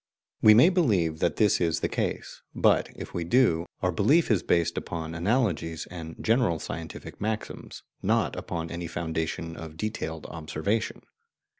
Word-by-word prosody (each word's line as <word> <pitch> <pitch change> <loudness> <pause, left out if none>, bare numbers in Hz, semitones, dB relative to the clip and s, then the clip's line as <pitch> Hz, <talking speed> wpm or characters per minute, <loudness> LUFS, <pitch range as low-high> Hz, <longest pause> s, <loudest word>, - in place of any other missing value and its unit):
We 110 0 +8
may 140 +10 +8
believe 100 - +2
that 85 -3 +1
this 105 -4 +3
is 85 -2 +1
the - - +1
case, - - -3
but - - +3
if - - -8
we 85 - -2
do, 85 -4 +3 0.2
our 90 - +3
belief 130 - +3
is 105 - +3
based 85 0 +1
upon 80 -1 -4
analogies 85 -4 0
and 80 -2 -7
general 115 -7 +2
scientific 80 +1 -7
maxims, 110 +1 -4 0.2
not - - +1
upon 80 -1 -4
any 85 0 -4
foundation 80 0 -3
of 80 -1 -9
detailed 80 -6 -4
observation. 80 +7 -3
85 Hz, 150 wpm, -27 LUFS, 80-110 Hz, 0.2 s, We